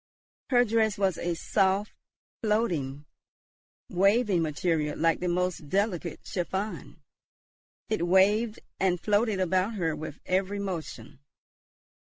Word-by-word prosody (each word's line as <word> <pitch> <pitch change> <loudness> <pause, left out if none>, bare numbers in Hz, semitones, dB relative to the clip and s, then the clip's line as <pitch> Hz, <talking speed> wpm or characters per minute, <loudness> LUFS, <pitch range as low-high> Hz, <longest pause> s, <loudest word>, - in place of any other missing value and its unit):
Her 245 -2 +5
dress 220 -1 +1
was 195 -2 +1
a 175 0 -1
soft, 195 +3 +1 0.5
floating, 170 - 0 0.8
waving 200 0 +3
material 155 -1 -1
like 165 0 +2
the 180 - -2
most 180 -3 -1
delicate 190 -3 -1
chiffon; 190 +3 -4 0.8
it 175 -6 -1
waved 205 +5 +3 0.2
and 180 -2 +2
floated 210 +1 +1
about 185 +4 +1
her 165 -5 -1
with 155 -1 -7
every 190 +2 0
motion. 180 -8 -6
190 Hz, 110 wpm, -28 LUFS, 170-210 Hz, 0.8 s, Her